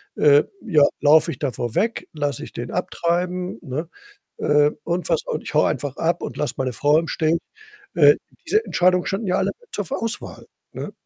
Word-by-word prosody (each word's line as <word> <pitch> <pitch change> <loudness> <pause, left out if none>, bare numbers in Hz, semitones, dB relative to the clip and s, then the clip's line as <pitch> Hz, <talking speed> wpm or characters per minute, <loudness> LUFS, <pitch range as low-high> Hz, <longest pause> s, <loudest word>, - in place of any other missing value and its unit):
äh, 145 0 +5 0.2
ja, 160 -10 +4 0.2
laufe 155 +3 +5
ich 135 - -8
davor 120 -4 -3
weg, 225 +2 0
lasse 145 -4 -2
ich - - -10
den 120 +1 -5
abtreiben, 180 -1 -1
ne, 150 +6 -5 0.5
äh, 150 0 +3
und 175 +1 -1
was. 165 - +1
Und 155 - -3
ich - - -7
haue 150 - +4
einfach 140 0 -3
ab 170 +1 0
und - - -5
lasse 150 - -1
meine 130 -1 -1
Frau 145 +7 +3
im 165 0 -2
Stich. 160 +1 +1 0.6
Äh, - - +7 0.3
diese 430 +1 +2
Entscheidungen 180 0 +2
standen 200 +2 -2
ja 180 - +2
alle - - +1 0.2
zur 205 - -3
ver 165 - -4
Auswahl, 230 0 -5 0.3
ne? - - -6
160 Hz, 190 wpm, -22 LUFS, 145-180 Hz, 0.6 s, Äh